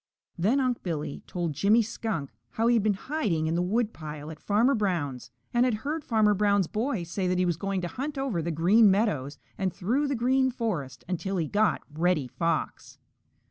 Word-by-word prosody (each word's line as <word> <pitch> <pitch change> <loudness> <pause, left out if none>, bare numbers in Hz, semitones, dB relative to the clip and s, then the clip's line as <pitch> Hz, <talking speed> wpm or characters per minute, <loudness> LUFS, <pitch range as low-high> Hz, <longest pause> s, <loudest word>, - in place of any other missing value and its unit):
Then 210 +10 +2
Unc' 255 -2 0
Billy 155 -5 -4
told 175 -4 -2
Jimmy 210 - +4
Skunk 215 - -4 0.2
how 225 - -1
he 240 - +5
had 230 - +4
been 205 -1 +2
hiding 200 - -1
in 160 - 0
the 170 - +1
woodpile 170 -7 -2
at 155 - -10
Farmer 225 +7 +2
Brown's 145 - -1 0.2
and 240 0 +4
had 250 -3 +2
heard 305 +2 -2
Farmer 215 -4 +3
Brown's 200 -1 +2
boy 220 - -2
say 180 +3 -2
that 180 0 +1
he 180 - +2
was 175 -2 +1
going 195 +2 -2
to 175 - -2
hunt 280 - -5
over 265 -11 -1
the 165 - -3
Green 190 +7 +5
Meadows 190 - 0 0.2
and 190 -2 0
through 250 +13 0
the 280 - 0
Green 260 +2 +2
Forest 180 - -3
until 185 +2 -2
he 165 -3 0
got 210 -1 +1
Reddy 160 -3 +1
Fox. 165 +5 -2
195 Hz, 195 wpm, -27 LUFS, 165-230 Hz, 0.2 s, he